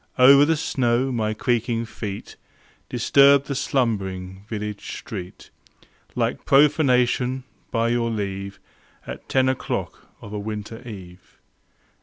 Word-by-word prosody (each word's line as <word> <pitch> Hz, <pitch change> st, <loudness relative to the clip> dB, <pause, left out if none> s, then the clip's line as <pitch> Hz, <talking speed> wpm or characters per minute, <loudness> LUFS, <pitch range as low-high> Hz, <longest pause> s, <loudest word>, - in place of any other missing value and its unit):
Over 140 Hz, +2 st, +8 dB
the 160 Hz, +1 st, +2 dB
snow 130 Hz, -3 st, 0 dB
my 110 Hz, -3 st, -1 dB
creaking 115 Hz, 0 st, 0 dB
feet 105 Hz, -3 st, -7 dB, 0.5 s
Disturbed 140 Hz, 0 st, +5 dB
the 140 Hz, -, -3 dB
slumbering 100 Hz, -9 st, -2 dB
village 105 Hz, -2 st, -5 dB
street 95 Hz, -4 st, -8 dB, 0.6 s
Like -, -, -1 dB
profanation, 130 Hz, -3 st, +3 dB, 0.3 s
by 115 Hz, 0 st, +1 dB
your 120 Hz, -1 st, +1 dB
leave, 100 Hz, -2 st, -4 dB, 0.5 s
At -, -, -9 dB
ten 130 Hz, -1 st, +3 dB
o'clock 130 Hz, 0 st, -3 dB
of 100 Hz, -, -10 dB
a 105 Hz, -, -3 dB
winter 110 Hz, +2 st, -6 dB
eve. 90 Hz, -4 st, -11 dB
115 Hz, 115 wpm, -23 LUFS, 105-130 Hz, 0.6 s, Over